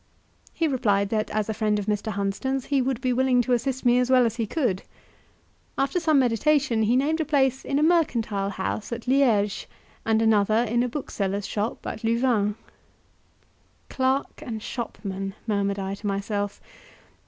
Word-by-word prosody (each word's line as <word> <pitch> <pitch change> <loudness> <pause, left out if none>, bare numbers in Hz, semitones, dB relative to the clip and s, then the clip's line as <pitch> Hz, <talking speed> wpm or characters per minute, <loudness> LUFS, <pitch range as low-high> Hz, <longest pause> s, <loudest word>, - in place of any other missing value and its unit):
He 330 - 0
replied 205 -8 +1
that 215 -1 -1
as 215 -1 -1
a 220 - -1
friend 210 -1 0
of 205 - -3
Mr. 210 +1 -1
Hunsden's 205 +7 -2
he 280 -2 +1
would 255 -1 -1
be 255 -1 +1
willing 255 0 +3
to 250 - 0
assist 260 +2 -1
me 245 0 +5
as 250 0 +1
well 255 -1 +5
as 230 0 -2
he 225 -2 -1
could. 225 - 0 1.0
After 275 +7 +1
some 315 -3 +3
meditation 255 0 +2
he 220 +3 +3
named 305 +5 +1
a - - +2
place 270 -3 +1
in 275 - -1
a 300 - +2
mercantile 235 - +1
house 200 +3 -4
at 235 +1 -5
Liege, 235 -7 +2 0.4
and 220 -1 +2
another 220 0 +3
in 235 +2 +1
a 250 - 0
bookseller's 200 -7 -3
shop 210 +2 -3
at 220 - -5
Louvain. 225 -3 +1 1.3
"Clerk 265 +3 -1
and 225 -7 -6
shopman!" 195 -5 -5
murmured 200 -2 0
I 195 0 -3
to 205 +1 -6
myself. 200 0 -2
230 Hz, 170 wpm, -25 LUFS, 205-265 Hz, 1.3 s, me